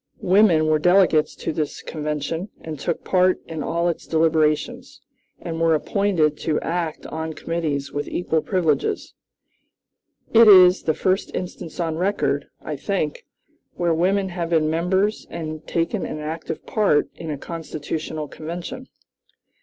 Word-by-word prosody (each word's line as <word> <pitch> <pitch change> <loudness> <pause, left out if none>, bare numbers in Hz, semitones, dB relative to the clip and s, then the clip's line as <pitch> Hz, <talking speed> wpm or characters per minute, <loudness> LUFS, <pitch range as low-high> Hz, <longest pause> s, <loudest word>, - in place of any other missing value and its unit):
Women 185 -4 +5
were 155 0 +3
delegates 180 -2 +4
to - - -4
this 150 -1 -3
convention, 150 +4 -3
and 155 -3 -7
took 155 - -2
part 185 0 +3
in 160 -2 -5
all 170 +4 0
its 170 - -3
deliberations, 160 -2 +1 0.4
and 165 -1 -5
were 165 -1 +4
appointed 160 -3 +1
to 155 -2 0
act 170 -2 -3
on 160 0 -4
committees 150 -4 -3
with 145 0 -3
equal 160 -3 0
privileges. 190 - 0 1.2
It 230 0 +8
is 185 -2 +8
the 155 - 0
first 185 +3 0
instance 180 -2 -6
on 165 -2 -1
record, 180 -7 0 0.2
I 150 -2 -4
think, 155 -2 -2 0.5
where 170 -1 +1
women 190 +4 +1
have 175 -2 -3
been 155 -2 +2
members 190 +6 0
and 155 -2 -6
taken 170 +4 -1
an - - -4
active 160 +1 -5
part 205 -9 +2
in 165 - -8
a 150 - -3
constitutional 155 0 -5
convention. 175 - -7
165 Hz, 140 wpm, -22 LUFS, 155-180 Hz, 1.2 s, It